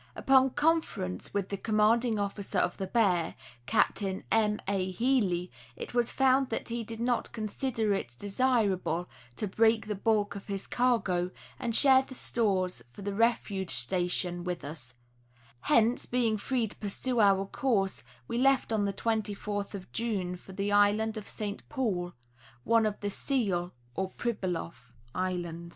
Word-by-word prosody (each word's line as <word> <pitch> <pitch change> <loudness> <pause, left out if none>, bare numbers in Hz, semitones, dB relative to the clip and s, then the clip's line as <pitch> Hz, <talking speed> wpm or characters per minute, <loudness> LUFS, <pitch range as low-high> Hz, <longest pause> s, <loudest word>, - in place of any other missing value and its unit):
Upon 265 0 +4
conference 290 - 0
with 200 -2 -2
the 200 - -3
commanding 220 +3 +2
officer 200 -1 -3
of 175 - +1
the 190 - -3
Bear, 185 -6 +2 0.3
Captain 200 -3 +1
M. 210 -1 +2
A. 190 -1 0
Healy, 185 -5 +1 0.2
it - - -7
was 240 -1 +2
found 265 0 +3
that 225 - -3
he 235 0 -2
did 225 +1 -8
not 240 +1 0
consider 220 0 -1
it 120 -11 -3
desirable 200 - +1 0.3
to - - -2
break 220 +3 +3
the 210 - -2
bulk 205 0 +1
of 200 - -8
his 195 -1 -4
cargo 210 -8 +1 0.3
and 235 -3 -1
share 265 -1 +7
the 265 0 -9
stores 195 -7 +1
for 200 - -11
the 200 0 -2
refuge 200 -4 +1
station 175 +4 0
with 180 -3 -4
us; 135 -5 -7 0.7
hence, 230 +2 +3
being 240 -3 +1
free 235 +2 0
to - - -10
pursue 235 +4 -1
our 195 -2 +4
course, 195 -3 0 0.3
we 235 - -2
left 270 -3 +3
on 210 -2 +1
the 200 - -1
24th 205 -1 -2
of 185 -2 -9
June 200 -6 -2
for 180 - -13
the 200 +2 -2
island 205 +2 +3
of 215 -2 -6
St. 205 -2 -4
Paul, 195 -11 -1 0.5
one 230 -1 +3
of 210 - -4
the 205 -1 -2
Seal 195 -10 -1 0.2
(or 190 +5 -2
Pribyloff) 180 - -4 0.2
islands. 175 -2 -3
205 Hz, 155 wpm, -30 LUFS, 185-230 Hz, 0.7 s, share